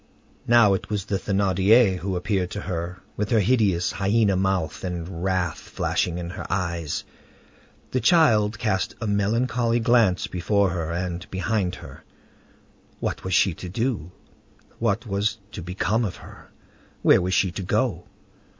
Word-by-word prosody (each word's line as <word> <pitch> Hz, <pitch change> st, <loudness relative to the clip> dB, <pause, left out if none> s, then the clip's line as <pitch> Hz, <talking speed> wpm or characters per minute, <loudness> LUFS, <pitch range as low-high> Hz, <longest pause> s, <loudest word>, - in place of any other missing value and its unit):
Now 120 Hz, -4 st, +6 dB
it 95 Hz, -, -3 dB
was 105 Hz, -2 st, -2 dB
the 100 Hz, -2 st, -1 dB
Thénardier 100 Hz, +1 st, +3 dB
who 95 Hz, 0 st, -3 dB
appeared 90 Hz, 0 st, -1 dB
to 105 Hz, -, -5 dB
her, 90 Hz, -1 st, -5 dB
with 105 Hz, 0 st, -2 dB
her 115 Hz, -, +3 dB
hideous, 100 Hz, -5 st, +2 dB
hyena 100 Hz, 0 st, +2 dB
mouth, 95 Hz, -4 st, -1 dB
and 90 Hz, -1 st, -5 dB
wrath 95 Hz, -3 st, 0 dB
flashing 85 Hz, -1 st, -2 dB
in 85 Hz, 0 st, -5 dB
her -, -, -7 dB
eyes. 85 Hz, -4 st, -2 dB, 0.9 s
The 130 Hz, -, +1 dB
child 115 Hz, -, +4 dB
cast 95 Hz, -5 st, -1 dB
a 115 Hz, -, -4 dB
melancholy 115 Hz, +4 st, +1 dB
glance 115 Hz, -6 st, +3 dB
before 100 Hz, +2 st, +1 dB
her 85 Hz, -2 st, -3 dB
and 85 Hz, 0 st, -4 dB
behind 95 Hz, -1 st, -1 dB
her. -, -, -12 dB, 1.0 s
What -, -, -3 dB
was 95 Hz, -1 st, 0 dB
she 100 Hz, -3 st, +4 dB
to 90 Hz, +2 st, -8 dB
do? 105 Hz, -, -2 dB, 0.7 s
What 115 Hz, 0 st, 0 dB
was 105 Hz, +1 st, -1 dB
to 105 Hz, -, -7 dB
become 95 Hz, +6 st, -1 dB
of 95 Hz, -5 st, -3 dB
her? -, -, -14 dB, 0.5 s
Where -, -, +6 dB
was 90 Hz, +1 st, 0 dB
she 95 Hz, -, +2 dB
to 100 Hz, -, -5 dB
go? 90 Hz, -, -1 dB
95 Hz, 150 wpm, -24 LUFS, 90-110 Hz, 1.0 s, Now